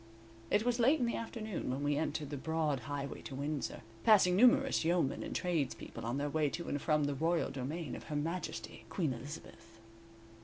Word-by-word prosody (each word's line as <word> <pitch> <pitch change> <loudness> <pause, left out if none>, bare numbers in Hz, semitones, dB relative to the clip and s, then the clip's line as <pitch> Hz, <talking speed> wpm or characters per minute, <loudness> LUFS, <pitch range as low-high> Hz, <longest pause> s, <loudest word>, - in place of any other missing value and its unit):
It 210 +2 +3
was 245 0 +1
late 270 +7 +5
in 245 - +2
the 235 - 0
afternoon 220 - -4
when 135 +3 -2
we 145 0 +2
entered 150 -1 -2
the - - -2
broad 155 -1 0
highway 140 +3 -5
to 135 - -7
Windsor, 145 0 -3 0.2
passing 190 -4 +6
numerous 240 -2 +5
yeomen 170 -4 +1
and - - -5
tradespeople 170 -6 -2
on 120 +3 -1
their 145 +1 0
way 150 0 +1
to 170 +4 -5
and 145 - -1
from 150 -2 +2
the 145 0 +1
royal 165 +3 +1
domain 145 +5 -4
of - - -9
Her 150 - -4
Majesty 165 +5 -3
Queen 160 -8 0
Elizabeth. 115 -3 -10
155 Hz, 190 wpm, -34 LUFS, 140-180 Hz, 0.2 s, passing